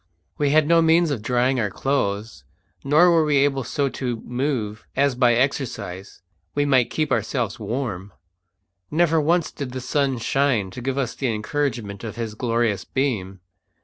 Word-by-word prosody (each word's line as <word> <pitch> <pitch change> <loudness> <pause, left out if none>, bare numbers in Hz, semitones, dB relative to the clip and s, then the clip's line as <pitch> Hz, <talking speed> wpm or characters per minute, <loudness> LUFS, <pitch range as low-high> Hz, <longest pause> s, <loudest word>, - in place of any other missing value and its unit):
We 145 -1 +2
had 155 +1 +4
no 165 0 +5
means 165 0 +4
of 125 -7 -2
drying 125 +3 +1
our 105 -3 0
clothes, 105 - -2 0.4
nor 155 +6 +5
were 165 -2 +4
we 150 -2 +2
able 135 -1 +2
so 140 +4 -1
to 125 -2 -3
move 120 -5 -3
as 140 0 +3
by 125 -1 +3
exercise 110 -8 -3 0.3
we 145 - +2
might 130 -4 +3
keep 155 -1 -1
ourselves 120 -7 -1
warm. 105 -4 -4 0.8
Never 165 0 +2
once 170 +2 +1
did 130 -3 -6
the 130 - -3
sun 135 +1 0
shine 120 -4 +1
to 125 - -8
give 135 +2 -2
us 130 -4 -1
the 135 - -2
encouragement 110 -3 -3
of 110 - -6
his 115 -2 -4
glorious 115 -2 0
beam. 100 -9 -2
130 Hz, 165 wpm, -23 LUFS, 110-145 Hz, 0.8 s, no